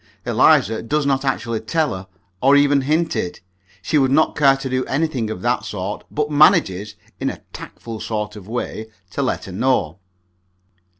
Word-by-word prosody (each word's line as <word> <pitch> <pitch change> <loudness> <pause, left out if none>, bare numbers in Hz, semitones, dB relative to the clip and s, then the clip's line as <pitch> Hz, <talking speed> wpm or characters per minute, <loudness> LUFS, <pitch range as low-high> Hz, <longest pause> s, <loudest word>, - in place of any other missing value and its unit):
Eliza 110 +2 +3
does 150 +5 -1
not 135 -1 +1
actually 115 -4 -1
tell 155 +7 0
her, 95 0 -8 0.3
or 135 +2 +5
even 145 -1 +4
hint 160 +4 0
it 90 - -3 0.4
she 150 - +2
would 135 -1 +3
not 155 +4 +3
care 135 -2 +4
to 135 - -5
do 130 0 0
anything 135 -6 -1
of 95 -4 -6
that 120 +1 +1
sort. 100 0 -5
But 150 0 -2
she - - -5
manages, 105 - +4 0.2
in - - 0
a - - -8
tactful 115 -2 -8
sort 105 -1 -3
of 100 -2 -11
way, 110 -1 -4 0.2
to - - -2
let - - -1
her 95 - -8
know. 95 -6 0
130 Hz, 180 wpm, -20 LUFS, 105-145 Hz, 0.4 s, or